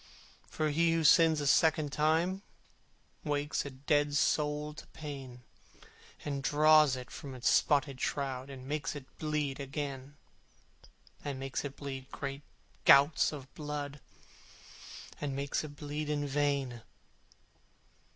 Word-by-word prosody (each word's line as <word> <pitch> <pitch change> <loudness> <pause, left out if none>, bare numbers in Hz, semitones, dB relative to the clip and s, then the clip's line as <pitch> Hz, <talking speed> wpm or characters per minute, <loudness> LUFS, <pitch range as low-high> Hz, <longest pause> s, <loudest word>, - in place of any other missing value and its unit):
For 155 -1 -1
he 165 +2 +3
who 165 -1 +1
sins 160 +1 +6
a - - -2
second 155 0 +3
time 165 +5 +1 0.8
Wakes 145 -1 -1
a - - -4
dead 145 +2 0
soul 150 -1 +1
to 155 - -11
pain, 135 -5 -8 0.8
And 140 -2 -2
draws 150 0 +5
it 125 -1 -8
from 135 -2 -8
its 125 - -2
spotted 140 -3 +3
shroud 135 -1 -2
And 130 -1 -9
makes 150 +1 -2
it 140 -3 -7
bleed 150 -3 -1
again, 140 0 -5 1.1
And 140 -2 -4
makes 135 -1 -3
it 140 -1 -6
bleed 135 -2 -7
great 140 0 -5 0.4
gouts 140 +3 +6
of 140 -3 -9
blood, 145 -1 -5 1.2
And 140 -2 -2
makes 140 +2 -1
it 145 -1 -8
bleed 150 +1 -4
in 145 -1 0
vain! 140 -4 0
145 Hz, 130 wpm, -32 LUFS, 135-150 Hz, 1.2 s, sins